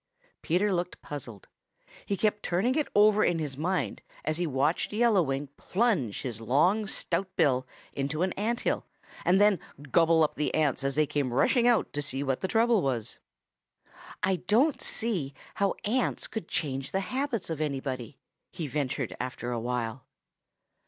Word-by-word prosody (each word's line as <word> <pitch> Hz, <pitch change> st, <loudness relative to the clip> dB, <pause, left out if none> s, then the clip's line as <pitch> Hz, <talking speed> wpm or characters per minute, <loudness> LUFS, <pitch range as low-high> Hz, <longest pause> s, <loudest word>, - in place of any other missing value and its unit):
Peter 190 Hz, +5 st, +1 dB
looked 180 Hz, 0 st, -2 dB
puzzled. 120 Hz, -9 st, -7 dB, 0.6 s
He 200 Hz, -, 0 dB
kept 210 Hz, 0 st, +1 dB
turning 190 Hz, +9 st, +1 dB
it 300 Hz, +1 st, 0 dB
over 210 Hz, 0 st, +6 dB
in 175 Hz, -, +2 dB
his 150 Hz, -4 st, -3 dB
mind 180 Hz, +6 st, -1 dB, 0.2 s
as 155 Hz, +2 st, -1 dB
he 175 Hz, -, 0 dB
watched 145 Hz, +3 st, +1 dB
Yellow 220 Hz, -2 st, +4 dB
Wing 135 Hz, -2 st, -2 dB
plunge 185 Hz, -, 0 dB
his 115 Hz, -4 st, -5 dB
long 175 Hz, -, +2 dB
stout 185 Hz, 0 st, -1 dB
bill 130 Hz, -6 st, +2 dB, 0.3 s
into 145 Hz, +4 st, -1 dB
an 185 Hz, -, 0 dB
ant 230 Hz, +4 st, -1 dB
hill -, -, -1 dB, 0.4 s
and 185 Hz, +2 st, +4 dB
then 205 Hz, -3 st, +5 dB, 0.3 s
gobble 165 Hz, -1 st, +5 dB
up 150 Hz, -, +1 dB
the 150 Hz, -, -1 dB
ants 145 Hz, -3 st, +1 dB
as 135 Hz, 0 st, 0 dB
they 155 Hz, 0 st, +4 dB
came 140 Hz, -3 st, -1 dB
rushing 235 Hz, -, +3 dB
out 240 Hz, -2 st, +3 dB
to 145 Hz, -, -1 dB
see 140 Hz, -1 st, -2 dB
what 135 Hz, -2 st, -1 dB
the 190 Hz, -, 0 dB
trouble 225 Hz, +1 st, +3 dB
was. 125 Hz, -7 st, -2 dB, 1.0 s
"I 190 Hz, -1 st, +2 dB
don't 235 Hz, -, +2 dB
see 175 Hz, -12 st, -1 dB, 0.2 s
how 200 Hz, -1 st, +1 dB
ants 245 Hz, +4 st, 0 dB
could 220 Hz, -7 st, -5 dB
change 135 Hz, -2 st, -2 dB
the 195 Hz, -, +1 dB
habits 255 Hz, -4 st, -2 dB
of 155 Hz, -1 st, -3 dB
anybody," 135 Hz, -3 st, -3 dB, 0.3 s
he 170 Hz, -4 st, -4 dB
ventured 130 Hz, -7 st, -2 dB
after 125 Hz, -1 st, -4 dB
a 120 Hz, -, -1 dB
while. 120 Hz, 0 st, -3 dB
160 Hz, 165 wpm, -28 LUFS, 135-205 Hz, 1.0 s, over